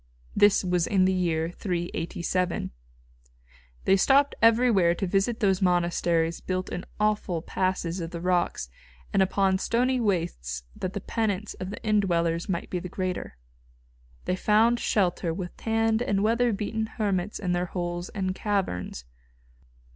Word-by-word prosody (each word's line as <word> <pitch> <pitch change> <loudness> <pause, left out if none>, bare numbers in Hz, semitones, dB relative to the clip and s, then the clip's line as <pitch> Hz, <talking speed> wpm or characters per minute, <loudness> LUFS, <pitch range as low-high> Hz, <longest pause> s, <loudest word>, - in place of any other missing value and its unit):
This 205 -1 +5
was 180 -2 +1
in 190 -2 +3
the 190 - +3
year 165 -3 0
387. 175 0 -2 1.1
They 195 - +5
stopped 275 +8 +4
everywhere 225 -7 +4
to 195 - -2
visit 195 +5 0
those 195 -2 +2
monasteries 170 -2 +1
built 185 0 -3
in 180 - -5
awful 210 -6 0
passes 185 -2 -1
of 165 -1 -4
the 170 -1 -6
rocks 175 - 0 0.5
and 195 - +4
upon 190 0 +2
stony 250 +5 +1
wastes 165 - -1
that 185 - -4
the 200 - -4
penance 210 -2 -2
of 185 - -6
the 205 - -6
indwellers 170 -5 +1
might 175 -2 -3
be 180 - -1
the 180 - -7
greater. 180 - -4 0.9
They 185 - 0
found 220 +5 +3
shelter 180 -6 0
with 180 -1 -6
tanned 225 0 +1
and 200 -5 +1
weather 235 +2 +2
beaten 220 +2 -2
hermits 205 -3 -2
in 185 -3 -2
their 175 0 0
holes 175 0 -4
and 190 -2 -2
caverns. 185 - -2
185 Hz, 145 wpm, -27 LUFS, 175-210 Hz, 1.1 s, This